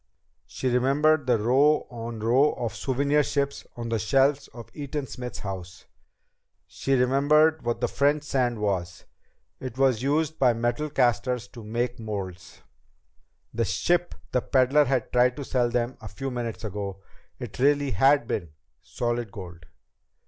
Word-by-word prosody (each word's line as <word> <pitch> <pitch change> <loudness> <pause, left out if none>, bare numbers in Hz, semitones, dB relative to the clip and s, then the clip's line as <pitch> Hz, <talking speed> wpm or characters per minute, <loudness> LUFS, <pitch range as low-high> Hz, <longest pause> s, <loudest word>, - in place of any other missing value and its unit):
She 130 - -4
remembered 140 +4 +2
the 120 -2 +4
row 135 +8 +3
on 115 -2 -6
row 130 +7 +3
of 115 -5 -4
souvenir 140 +3 +1
ships 140 0 -2
on 115 -1 -4
the 115 -1 0
shelves 135 +5 +2
in 120 - -9
Eaton 145 -1 -4
Smith's 125 -2 -7
house. 95 -3 -7 0.8
She 135 - -1
remembered 145 +5 +3
what 120 +1 -1
French 145 +4 +1
sand 130 -5 0
was. 95 -5 -2 0.5
It 130 -2 -7
was 130 -4 +3
used 155 +3 0
by 125 -3 +4
metal 120 +6 -1
casters 125 -2 +1
to 115 - -11
make 120 +3 -2
molds! 100 -5 -7 0.9
The 115 - 0
ship 175 - 0 0.2
the 125 - +1
peddler 135 +4 +3
had 130 -3 -1
tried 125 0 +4
to 145 - -4
sell 125 -2 +1
them 120 +1 -1
a - - -8
few 135 -1 -5
minutes 120 -3 -4
ago! 100 -2 -5 0.3
It - - -8
really 145 +1 +3
had 135 +6 +4
been 85 -9 -4 0.3
solid 120 -3 -3
gold! 85 -6 -10
125 Hz, 150 wpm, -26 LUFS, 115-140 Hz, 0.9 s, the